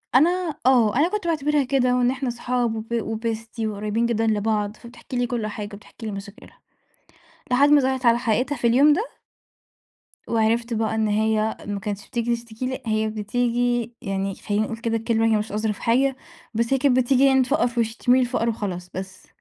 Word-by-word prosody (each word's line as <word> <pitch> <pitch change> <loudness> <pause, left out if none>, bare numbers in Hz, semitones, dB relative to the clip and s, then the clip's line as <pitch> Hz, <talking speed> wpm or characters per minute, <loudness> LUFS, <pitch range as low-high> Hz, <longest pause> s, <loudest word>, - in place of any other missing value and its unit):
أنا 340 +3 +3
آه. 240 -5 +4
أنا 300 +6 +3
كنت 415 -1 -3
باعتبرها 300 -3 +1
كده 255 -1 +2
وإن 250 0 +2
إحنا 265 -1 -3
أصحاب 240 -1 -1
وب 225 +2 -2 0.2
وbestie 225 0 -4
وقريّبين 215 +2 -1
جدًا 225 -1 0
لبعض، 210 -1 0
فبتحكي 245 +1 -9
لي 245 0 +1
كل 235 -3 -2
حاجة 210 -1 -6
وبتحكي 210 +3 -12
لي 215 - -3
مشاكلها. 200 +1 -10 0.9
لحد 275 +4 +5
ما 295 -1 +6
ظهرت 260 -1 -1
على 235 0 +5
حقيقتها 250 +4 0
في 235 - +1
اليوم 275 +6 +5
ده. 410 +9 0 1.2
وعرِفت 230 +1 +1
بقى 220 0 0
إن 220 -1 +1
هي 215 +1 +1
ما 205 0 -3
كانتش 205 -1 -5
بتيجي 235 0 -1
تشتكي 235 +1 -7
لي، 260 0 -3
هي 215 -1 0
بتيجي 240 +2 -1
يعني 195 -1 -2
خلّينا 210 0 -1
نقول 225 - -5
كده 230 0 -1
الكلمة 225 0 0
هي 225 -1 +3
مش 210 +1 -4
أظرف 210 0 -2
حاجة، 260 +3 +2 0.4
بس 230 +3 0
هي - - +4
كانت 265 -1 +3
بتيجي 260 +2 +3
يعني 265 -1 +5
تفقّر 245 -1 +2
في 240 0 -3
وِشّي، 225 0 -1
ترمي 250 +1 +3
لي - - +3
الفقر 240 -1 -1
وخلاص 185 -5 -4
بس. 190 0 -7
230 Hz, 190 wpm, -23 LUFS, 215-250 Hz, 1.2 s, ما